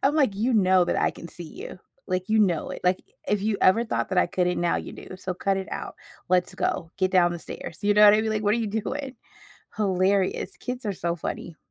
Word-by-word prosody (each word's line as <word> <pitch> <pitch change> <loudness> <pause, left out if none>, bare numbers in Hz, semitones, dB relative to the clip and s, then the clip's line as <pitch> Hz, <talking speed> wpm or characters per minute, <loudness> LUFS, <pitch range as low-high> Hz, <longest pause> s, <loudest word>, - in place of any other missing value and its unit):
I'm 280 +2 +3
like, 270 -10 +3
"you 225 +6 0
know 185 -3 +5
that - - -1
I - - +2
can 170 - -10
see 175 - -9
you." 160 - -9 0.3
Like, 185 +2 -2
"You 220 - +4
know 180 -7 +2
it," - - -6
like, 180 +1 +2 0.3
"i - - +1
if 205 -1 +1
you 210 -1 0
ever 225 +5 +5
thought 225 - -2
that 190 - -1
I - - +5
couldn't, 180 -1 0
now 175 0 +2
you - - -6
do, - - -11
so 185 0 -4
cut 195 +2 0
it 190 - -5
out, - - -5 0.4
let's 180 -1 +2
go, 165 - -2
get 185 -1 +1
down 175 -2 +4
the 175 - -5
stairs." 165 0 -8
you 205 0 +3
know 210 0 +7
what 205 0 +9
I 215 - +3
mean? 220 - -1
Like, 215 -1 -1
what 205 0 +3
are - - 0
you 230 - -1
doing? 260 +6 -4 0.6
Hilarious, 190 -1 +1
kids 250 0 -5
are 205 - 0
so 170 -1 -2
funny. 165 0 -5
195 Hz, 255 wpm, -25 LUFS, 180-215 Hz, 0.6 s, what